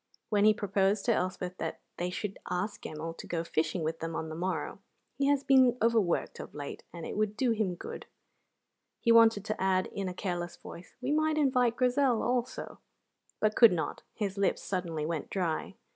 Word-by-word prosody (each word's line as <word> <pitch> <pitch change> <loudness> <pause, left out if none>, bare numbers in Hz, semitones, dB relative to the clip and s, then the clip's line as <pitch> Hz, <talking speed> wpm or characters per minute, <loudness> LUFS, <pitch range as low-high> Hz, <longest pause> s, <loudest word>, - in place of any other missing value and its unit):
When 205 -1 +3
he 215 - +7
proposed 195 0 +1
to 235 - +4
Elspeth 185 -1 -2
that - - -3 0.2
they 175 +1 -1
should 195 +2 -4
ask 180 +4 -2
Gemmell 160 +2 -6
to - - -8
go 165 -1 -1
fishing 165 +1 -1
with 160 +1 -2
them 165 0 -4
on 160 - -3
the 160 - -6
morrow 185 +3 -3 0.4
("He 275 - +3
has 285 -1 +3
been 260 -3 +5
overworked 225 -6 +1
of - - -9
late 145 -1 -6
and 170 -2 -7
it - - -5
would 215 0 0
do 255 -3 +2
him 210 -5 0
good") - - -8 0.9
he 235 - +3
wanted 225 -3 +6
to 215 -2 -3
add, 185 -1 +2
in 195 -2 -2
a 180 - -7
careless 175 -2 -3
voice, 170 - -11
"We 255 +3 -1
might 310 +1 +2
invite 250 -5 +3
Grizel 250 -1 +2
also," 250 +1 -2 0.6
but 215 0 +2
could 230 -5 +8
not; 160 -4 -3
his 200 -2 -3
lips 200 - +1
suddenly 170 -5 -2
went 160 -2 -3
dry. 175 -5 -2
200 Hz, 190 wpm, -30 LUFS, 175-235 Hz, 0.9 s, could